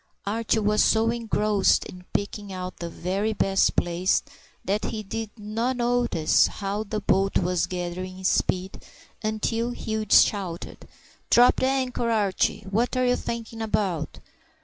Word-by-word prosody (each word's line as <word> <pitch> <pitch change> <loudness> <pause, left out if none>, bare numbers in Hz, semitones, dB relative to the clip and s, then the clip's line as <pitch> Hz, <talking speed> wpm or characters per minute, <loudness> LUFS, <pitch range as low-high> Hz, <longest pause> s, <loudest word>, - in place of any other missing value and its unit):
Archie 225 +2 0
was 210 0 +3
so 225 +1 +3
engrossed 215 -3 +1
in 180 0 -11
picking 205 0 -3
out 185 -1 -6
the 170 - -5
very 195 +6 -2
best 195 -1 +2
place 175 +2 +1 0.4
that 205 +3 0
he 215 -1 -4
did 225 +2 -4
not 225 +4 -2
notice 240 -10 +2
how 200 +1 -3
the 215 0 -3
boat 195 0 +2
was 180 -1 0
gathering 185 +1 -5
speed 185 0 0 0.4
until 225 +2 -1
Hugh 220 -3 -3
shouted,— 185 -6 +2 0.4
"Drop 245 +1 +6
the 260 - +2
anchor, 255 -3 0
Archie! 210 -4 +1
What 230 +6 0
are 255 - +2
you 250 0 +3
thinking 230 -1 -5
about?" 190 -8 -2
210 Hz, 140 wpm, -25 LUFS, 185-225 Hz, 0.4 s, Drop